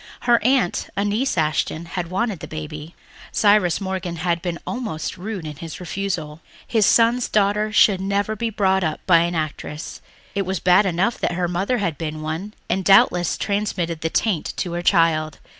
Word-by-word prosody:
Her 240 -2 +3
aunt, 255 -6 +1
Annice 205 +4 0
Ashton, 155 +1 0
had 170 0 -4
wanted 195 0 -1
the - - -8
baby. 155 +1 -7 0.4
Cyrus 205 -5 +3
Morgan 190 -3 -3
had 170 0 -1
been 175 -2 -3
almost 220 -11 -4
rude 190 -2 -6
in 150 -2 -7
his 165 0 -8
refusal. 175 -4 -4 0.2
His 220 -3 +2
son's 235 +1 +3
daughter 210 +1 +1
should 200 -2 +4
never 200 +2 -1
be 230 +2 -2
brought 190 -3 +1
up 155 -2 -1
by 170 -3 +6
an 170 +1 0
actress; 155 -1 -5 0.3
it 200 - 0
was 190 -1 -2
bad 185 +3 +4
enough 190 +6 0
that - - -1
her 175 0 -1
mother 190 +8 0
had 170 -9 -2
been 155 -1 -4
one 165 +7 -5
and 190 - 0
had 190 - -6
doubtless 180 -3 +4
transmitted 185 -6 -2
the 160 - -1
taint 185 -3 -1
to 175 -3 -2
her 175 - -2
child. 165 -4 +2
180 Hz, 180 wpm, -22 LUFS, 165-205 Hz, 0.4 s, by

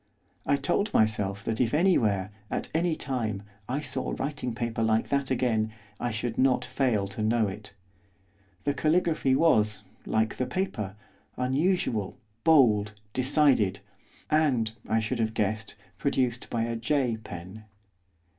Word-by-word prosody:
I 145 - +4
told 175 +9 0
myself 100 -2 +1
that 110 +2 -1
if 120 +2 +1
anywhere, 110 - +2 0.2
at - - -3
any 165 0 +1
time, 110 -9 -3 0.3
I 135 +4 -1
saw 130 -3 -2
writing 135 -4 -3
paper 115 -1 -2
like 110 0 +2
that 140 -1 0
again, 115 -4 +1 0.3
I 120 - -1
should 110 +1 -3
not 130 -1 +3
fail 115 -8 0
to 100 +2 -5
know 110 0 +2
it. 100 +1 -8 0.9
The 145 - +1
caligraphy 155 -4 +2
was, 110 - +3 0.2
like 110 0 +1
the 130 - -1
paper, 110 - -3 0.4
unusual, 130 - 0 0.3
bold, 110 -10 +5 0.2
decided, 130 -7 +3 0.5
and, 135 -8 +2 0.2
I 110 - +3
should 110 +2 -2
have 110 0 0
guessed, 105 0 -1 0.2
produced 125 -4 0
by 115 -1 0
a 115 0 -2
J 125 -1 0
pen. 95 +1 -9
120 Hz, 135 wpm, -28 LUFS, 110-140 Hz, 0.9 s, bold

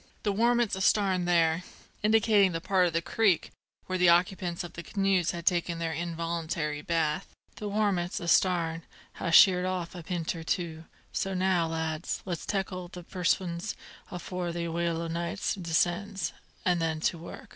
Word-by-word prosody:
The 205 - +1
warmints 235 +1 +2
astarn 190 -2 +2
there" 165 -1 +3 0.4
indicating 210 -3 +4
that 165 - -3
part 185 0 +3
of 170 - -3
the 165 0 0
creek 205 -7 +2 0.3
where 185 0 -2
the 180 -1 +6
occupants 175 0 +2
of 175 - -8
the 170 - -6
canoes 195 -2 +1
had 170 -1 -4
taken 175 -2 +1
their 165 -1 -2
involuntary 165 -2 -3
bath 165 +1 0 0.3
"the 210 - -4
warmints 200 -4 0
astarn 170 -1 +2 0.4
ha' - - -1
sheered 180 +1 +7
off 185 -2 -3
a 180 - -7
p'int 170 0 -2
or 165 - -6
two; 165 -1 -3 0.3
so 195 0 -1
now, 180 -2 +2
lads, 160 0 -3
let's 175 -4 -4
tackle 185 -3 -2
the 180 0 -10
perwisions 180 +2 -1 0.3
afore 180 -1 -4
the 170 0 -3
wail 170 0 -1
o' - - -3
night 170 +4 -2
descends, 175 +2 0 0.3
an' 180 -1 +3
then 160 -1 -1
to 170 - 0
work!" 165 - -10
175 Hz, 165 wpm, -29 LUFS, 165-190 Hz, 0.4 s, sheered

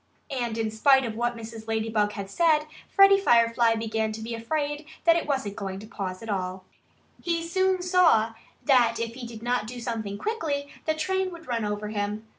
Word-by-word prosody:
And 240 -4 -2
in 220 -1 -1
spite 265 +4 +4
of 225 -2 -4
what 240 +1 -1
Mrs. 225 -1 -9
Ladybug 220 -2 0
had 200 -2 -5
said, 310 - +3 0.3
Freddie 395 0 +6
Firefly 230 -6 +4
began 220 -1 -1
to 220 - -7
be 230 +1 -5
afraid 295 +5 -2 0.2
that 335 -1 +6
it 335 - -1
wasn't 265 -8 -1
going 195 -3 -4
to 205 - -9
pause 195 -3 -5
at - - -8
all. 185 -1 -3 0.6
He 335 -1 -1
soon 375 +1 +1
saw 335 - +4 0.3
that 245 -5 +4
if 230 0 -3
he 245 -1 -7
did 230 -1 -10
not 245 -3 0
do 245 +2 -7
something 225 -4 -4
quickly 295 - -2 0.2
the 315 - +2
train 375 +4 0
would 335 -2 -11
run 235 -3 -1
over 210 0 -3
him. 210 +1 -3
230 Hz, 195 wpm, -26 LUFS, 220-300 Hz, 0.6 s, Freddie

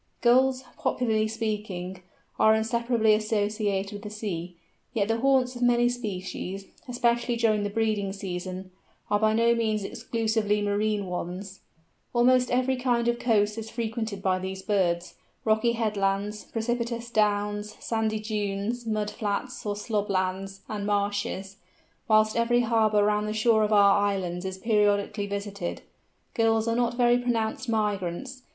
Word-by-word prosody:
Gulls, 260 +2 +4 0.2
popularly 220 -3 +1
speaking, 210 -5 -4 0.4
are 220 0 +6
inseparably 230 0 +2
associated 210 -2 0
with 205 - -7
the 210 - -7
sea, 185 -5 -5 0.4
yet 205 -3 +1
the 225 0 +1
haunts 260 -1 +2
of 245 - -7
many 240 0 +4
species, 195 -4 -5 0.2
especially 240 -1 +1
during 220 -2 +2
the 205 - -1
breeding 210 -2 0
season, 185 -1 -5 0.4
are 205 - +3
by 215 0 +3
no 230 +1 +4
means 220 -3 0
exclusively 220 -1 -1
marine 205 0 0
ones. 185 +2 -5 0.5
Almost 250 +1 +4
every 255 +1 +1
kind 245 -2 +1
of 240 0 +1
coast 210 -2 +2
is 220 0 -7
frequented 220 -3 -4
by 185 -1 +2
these 190 0 -5
birds—rocky 205 +4 0
headlands, 210 -2 -1
precipitous 235 +1 -3
downs, 210 -1 0
sandy 220 -1 -1
dunes, 215 +2 -3
mud 215 -1 -1
flats 220 +3 -3
or 205 - -1
slob 210 0 -2
lands, 195 +1 -2
and 205 -1 -4
marshes; 200 -1 -1 0.5
whilst 215 0 +4
every 235 +1 +3
harbour 220 -3 +3
round 210 0 +1
the 215 - -2
shore 220 0 +3
of 215 0 +1
our 200 -1 +6
islands 190 -3 -1
is 190 0 -4
periodically 205 0 +1
visited. 200 -2 -4 0.5
Gulls 225 0 +2
are 230 - +1
not 240 0 0
very 245 0 +4
pronounced 240 0 -1
migrants. 210 +3 -2
215 Hz, 140 wpm, -27 LUFS, 200-230 Hz, 0.5 s, are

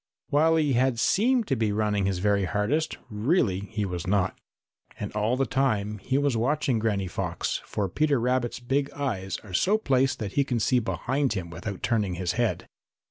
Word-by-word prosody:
While 160 +3 +4
he 150 -4 +2
had 125 0 +2
seemed 235 - +2
to 135 - +2
be 110 -3 0
running 105 -2 +1
his 95 -2 0
very 100 +1 +2
hardest, 105 - 0
really 105 - +1
he 105 -2 -2
was 90 -2 -4
not. 95 -1 +1 0.6
And 105 - -4
all 105 +4 0
the 135 - +2
time 110 -7 0
he 130 +7 -1
was 140 -3 +1
watching 135 +1 +1
Granny 105 -3 0
Fox, 90 - -3
for 100 -2 -2
Peter 145 - +1
Rabbit's 125 0 0
big 135 +3 0
eyes 110 -10 -3
are 100 -4 -11
so 195 - +3
placed 135 -9 +1
that 100 -3 -5
he 140 - +3
can 125 -4 -1
see 125 +3 +3
behind 120 +6 -1
him 90 -4 -5
without 90 +4 -6
turning 105 -6 +1
his 90 0 -1
head. 120 0 -1
115 Hz, 190 wpm, -26 LUFS, 100-135 Hz, 0.6 s, While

